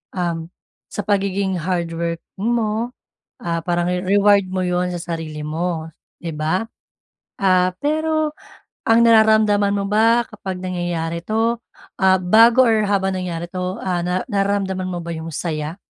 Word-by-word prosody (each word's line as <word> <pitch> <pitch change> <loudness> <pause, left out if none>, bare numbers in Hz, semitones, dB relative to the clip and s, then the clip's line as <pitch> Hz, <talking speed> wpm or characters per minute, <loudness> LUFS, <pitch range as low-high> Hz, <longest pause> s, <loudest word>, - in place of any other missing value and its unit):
um, 175 -2 -1 0.5
sa 205 - -5
pagiging 195 -2 0
hardworking 170 +2 -3
mo, 230 0 0 0.5
ah, 170 -1 -2
parang 175 0 0
re 180 0 -1
reward 200 +1 +4
mo 185 0 -2
'yon 180 0 0
sa 175 - -3 0.2
sarili 155 -2 -6
mo, 165 +1 -2 0.3
'di 165 -3 -5
ba. 160 +8 -1 0.8
Ah, 185 -1 +3
pero 310 +1 0 0.6
ang 225 +1 +5
nararamdaman 215 -3 +5
mo 200 - -1
ba 225 +3 +4
kapag 190 -4 -6
nangyayari 175 -2 -3
'to, 225 +3 0 0.4
ah, 190 0 +4
bago 230 +7 +6
or 220 -2 +3
habang 195 -2 0
nangyari 175 -2 -4
'to, 185 +1 -4
ah, 180 -2 -1
nar 180 +1 -2
nararamdaman 195 -2 -1
mo 175 - -3
ba 170 0 -5
'yong 160 +1 -6
saya? 155 +1 -4
185 Hz, 145 wpm, -20 LUFS, 175-210 Hz, 0.8 s, bago